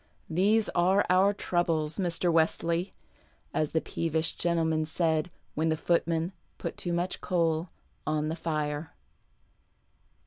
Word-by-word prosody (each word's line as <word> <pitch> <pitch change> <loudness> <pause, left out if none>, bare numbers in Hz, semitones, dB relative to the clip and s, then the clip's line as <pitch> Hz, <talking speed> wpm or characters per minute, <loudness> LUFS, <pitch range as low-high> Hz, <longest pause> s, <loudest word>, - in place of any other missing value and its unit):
" - - -36
These 215 +2 +4
arc 185 +3 +3
our 190 +2 +5
troubles, 175 -5 0
Mr. 175 -1 +1
Wesley," 165 +2 +1 0.6
as 155 - +1
the 160 - 0
peevish 160 0 -1
gentleman 165 -2 +1
said 160 0 0 0.2
when 160 +2 +1
the 160 - +1
footman 170 +1 +1 0.3
put - - -4
too 175 - -3
much 175 +2 -1
coal 165 -1 +1 0.4
on 155 0 +1
the 160 - -2
fire. 155 -2 -3
165 Hz, 130 wpm, -29 LUFS, 160-175 Hz, 0.6 s, our